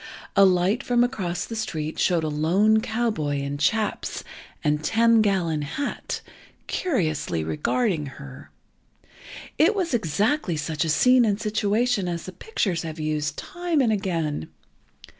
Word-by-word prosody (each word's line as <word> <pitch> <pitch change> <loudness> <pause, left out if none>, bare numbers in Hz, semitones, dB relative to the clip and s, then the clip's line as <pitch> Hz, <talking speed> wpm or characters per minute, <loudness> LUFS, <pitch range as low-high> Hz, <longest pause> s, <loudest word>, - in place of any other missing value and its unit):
A 200 - +7
light 185 +6 +2
from 245 -2 +2
across 185 -9 -2
the 230 - -6
street 160 -8 -3
showed 175 -3 +2
a - - 0
lone 185 +9 +3
cowboy, 220 -11 -1
in 140 +1 -3
chaps, 210 +9 0 0.4
and 150 0 +1
"ten 230 +4 +4
gallon 180 -7 +1
hat," 215 - -4 0.4
curiously 155 - -1
regarding 150 - 0
her. 135 -1 -11 1.1
It 350 +8 +5
was 360 -7 -1
exactly 210 - 0
such 150 +1 -2
a 165 - -2
scene 250 +10 +5
and 205 -2 +1
situation 215 0 +1
as 170 -1 -3
the 185 - -6
pictures 185 - -2
have 160 -1 -6
used, 155 0 -2
time 350 -3 -2
and 235 -5 +3
again. 165 - -2
185 Hz, 140 wpm, -24 LUFS, 155-230 Hz, 1.1 s, A